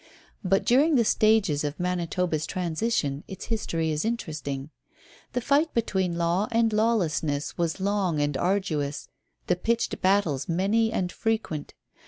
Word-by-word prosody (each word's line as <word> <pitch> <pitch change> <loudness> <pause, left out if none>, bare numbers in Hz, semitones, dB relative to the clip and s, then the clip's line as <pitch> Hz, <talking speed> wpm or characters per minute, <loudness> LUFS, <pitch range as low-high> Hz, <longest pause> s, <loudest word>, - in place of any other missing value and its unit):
But 195 +1 +2
during 285 +6 +4
the 235 -3 +4
stages 210 -10 +3
of 145 0 -3
Manitoba's 175 -3 -1
transition 170 -5 -1
its 190 -1 -8
history 165 -8 -1
is 150 0 -1
interesting. 155 -10 -4 0.6
The 250 - 0
fight 285 +6 +2
between 190 -6 0
law 170 +4 +1
and 230 -1 +2
lawlessness 165 -10 0
was 170 +1 -1
long 190 -5 0
and 145 -1 0
arduous, 160 -5 -1 0.4
the 180 - +2
pitched 230 +6 -1
battles 180 -9 +1
many 205 +6 +2
and 180 -4 -1
frequent. 220 -10 -2
180 Hz, 135 wpm, -26 LUFS, 155-220 Hz, 0.6 s, during